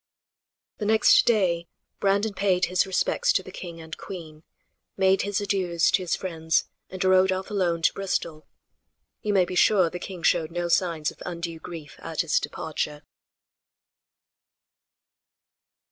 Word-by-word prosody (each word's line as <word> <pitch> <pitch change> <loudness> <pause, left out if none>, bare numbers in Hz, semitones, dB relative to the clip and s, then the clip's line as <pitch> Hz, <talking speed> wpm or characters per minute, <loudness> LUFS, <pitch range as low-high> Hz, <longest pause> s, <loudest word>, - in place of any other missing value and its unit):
The 210 - -2
next 220 0 +5
day 180 -7 +2 0.3
Brandon 200 +2 +1
paid 190 -2 +2
his 185 +2 +1
respects 485 - +1
to - - +1
the - - -10
king 170 -2 -8
and 160 0 -8
queen, 160 -5 -9 0.6
made 190 0 +3
his 205 -1 -1
adieus 185 -5 +1
to - - +2
his 180 - 0
friends 160 -3 -1 0.2
and 185 0 -4
rode 185 0 +4
off 190 +2 -3
alone 175 -5 0
to - - +4
Bristol. 170 -5 -3 0.7
You 210 - -1
may 190 -2 +4
be 180 - -6
sure 180 -2 +4
the 180 - -5
king 180 -2 -8
showed 165 -2 +2
no 175 0 -3
signs 165 -4 +1
of - - -20
undue 170 -2 -5
grief 160 -3 -9
at 165 -2 -2
his 165 -3 +1
departure. 150 -1 -4
180 Hz, 145 wpm, -25 LUFS, 165-195 Hz, 0.7 s, next